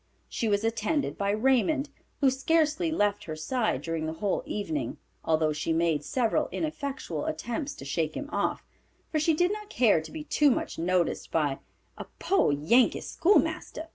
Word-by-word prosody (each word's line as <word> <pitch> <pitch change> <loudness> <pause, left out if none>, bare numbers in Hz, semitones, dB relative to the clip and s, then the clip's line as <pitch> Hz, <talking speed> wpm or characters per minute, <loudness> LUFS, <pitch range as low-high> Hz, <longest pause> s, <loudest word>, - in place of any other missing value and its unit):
She 230 - -2
was 205 0 +1
attended 225 +6 0
by 200 0 -1
Raymond, 265 +6 +2 0.3
who 270 -2 +5
scarcely 315 +4 +1
left 205 -9 0
her 155 - -5
side 155 - -1
during 165 -1 -2
the 160 - -3
whole 200 +2 0
evening, 155 - -3 0.3
although 155 -1 +2
she 155 +2 -1
made 160 -3 +1
several 250 - 0
ineffectual 275 - -3
attempts 240 - -3
to 135 - -10
shake 155 +2 -1
him 285 - -5
off, - - -1 0.5
for 310 - +1
she 310 +1 +2
did 355 +4 +2
not 420 -1 -7
care 225 - +3
to 160 - -10
be 315 -1 -6
too 295 -1 +3
much 245 - -1
noticed 175 0 0
by 145 -4 0 0.4
a - - -5
"poor 385 - +2
Yankee 180 - +3
schoolmaster." 325 -3 +1
225 Hz, 170 wpm, -28 LUFS, -, 0.5 s, who